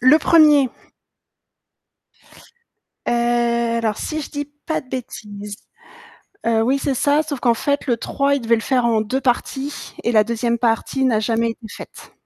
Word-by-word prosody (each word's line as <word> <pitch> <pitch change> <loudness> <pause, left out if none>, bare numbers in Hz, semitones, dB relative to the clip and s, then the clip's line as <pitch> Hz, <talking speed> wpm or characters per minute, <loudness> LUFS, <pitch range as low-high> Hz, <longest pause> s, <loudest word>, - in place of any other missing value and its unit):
Le 255 +5 +6
1er. 300 -5 +5 2.4
Heu, 235 -1 +1
alors 220 -2 -1
si 310 0 -3
je 290 - -7
dis 290 0 -3 0.2
pas 315 - -1
de 255 - -21
bêtises, 210 -5 -7 0.9
heu, 225 -1 +2
oui 265 +4 +1
c'est 275 - -1
ça 285 +4 +3
sauf 290 -4 -5
qu'en 235 -1 +3
fait 285 +5 -1
le 240 -3 +1
3 280 +4 0
il 280 - -2
devait 230 0 +3
le 225 - -3
faire 250 0 +1
en 225 -2 +2
2 255 +5 -2
parties 270 +3 -2
et 235 - +1
la 215 -2 +5
2e 235 +1 -1
partie 235 +3 0
n'a 225 -4 +2
jamais 230 +1 0
été 225 -1 -11
faite. - - -11
240 Hz, 165 wpm, -20 LUFS, 230-275 Hz, 2.4 s, Le